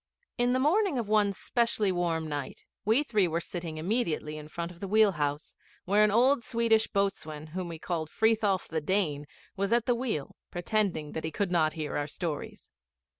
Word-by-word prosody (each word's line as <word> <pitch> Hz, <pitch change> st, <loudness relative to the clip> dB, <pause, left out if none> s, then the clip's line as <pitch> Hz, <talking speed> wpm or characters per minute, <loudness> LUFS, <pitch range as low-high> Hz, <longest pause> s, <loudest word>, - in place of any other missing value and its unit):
In 245 Hz, 0 st, +2 dB
the -, -, +3 dB
morning 345 Hz, +3 st, +2 dB
of 230 Hz, -4 st, -2 dB
one 210 Hz, -1 st, +3 dB
specially 220 Hz, 0 st, 0 dB
warm 170 Hz, -3 st, -1 dB
night 145 Hz, -3 st, -5 dB, 0.2 s
we 225 Hz, +7 st, +4 dB
three 215 Hz, -9 st, +2 dB
were 165 Hz, 0 st, -1 dB
sitting 170 Hz, -2 st, -5 dB
immediately 165 Hz, -4 st, -1 dB
in 150 Hz, 0 st, -8 dB
front 170 Hz, +2 st, -5 dB
of 170 Hz, -, -15 dB
the 195 Hz, -, -4 dB
wheel 215 Hz, +1 st, +5 dB
house, 145 Hz, -3 st, -2 dB, 0.3 s
where 205 Hz, +3 st, +4 dB
an 210 Hz, -, +5 dB
old 245 Hz, +4 st, +4 dB
Swedish 225 Hz, -1 st, +2 dB
boatswain 155 Hz, -6 st, -2 dB
whom 185 Hz, -1 st, -3 dB
we 165 Hz, -1 st, -6 dB
called 160 Hz, -1 st, -3 dB
'Frithiof 220 Hz, -3 st, +2 dB
the 160 Hz, -1 st, -2 dB
Dane' 150 Hz, -4 st, 0 dB, 0.3 s
was 200 Hz, +2 st, -1 dB
at 235 Hz, 0 st, +3 dB
the 245 Hz, -, +3 dB
wheel, 235 Hz, -, -3 dB
pretending 175 Hz, -4 st, -1 dB
that 160 Hz, -, -4 dB
he 160 Hz, -, -2 dB
could 180 Hz, +4 st, -2 dB
not 160 Hz, -3 st, +2 dB
hear 155 Hz, -2 st, -3 dB
our 145 Hz, 0 st, -1 dB
stories. 160 Hz, 0 st, -5 dB
185 Hz, 190 wpm, -29 LUFS, 160-220 Hz, 0.3 s, wheel